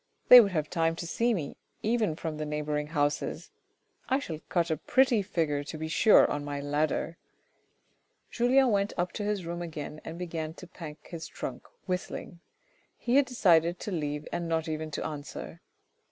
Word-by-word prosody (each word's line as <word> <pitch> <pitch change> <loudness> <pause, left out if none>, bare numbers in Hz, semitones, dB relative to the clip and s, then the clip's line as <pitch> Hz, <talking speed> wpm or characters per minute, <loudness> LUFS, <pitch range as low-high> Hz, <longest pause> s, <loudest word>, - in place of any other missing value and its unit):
They 250 -1 +13
would 200 -3 0
have 155 -3 0
time 165 -1 0
to 170 - -5
see 235 +8 +1
me, 165 -10 -3 0.3
even 220 -6 +1
from 160 -1 -4
the 155 - -3
neighbouring 150 0 -2
houses. 145 -1 -1 0.6
I 265 - +3
shall 165 - -5
cut 170 -2 +1
a 160 - +1
pretty 255 - +3
figure 160 -7 -1
to 155 - -6
be 160 +1 -4
sure 210 +7 +6
on 145 - -2
my 145 0 -4
ladder! 150 +3 -1 0.6
" - - -44
Julien 255 +2 +4
went 200 0 +1
up 175 0 0
to 210 - -4
his 205 -3 -1
room 170 +1 -4
again 155 -2 -6
and 160 - -7
began 165 -3 -4
to - - -10
pack 160 -3 -10
his 165 -2 -6
trunk - - -7 0.2
whistling. 180 -2 -4 0.6
He 245 +3 +1
had 280 -1 +4
decided 175 -8 +3
to 210 - -4
leave 150 -3 -3
and 170 -1 -3
not 165 0 0
even 155 0 -3
to 150 - -4
answer. 150 +2 -7
165 Hz, 180 wpm, -29 LUFS, 155-195 Hz, 0.6 s, They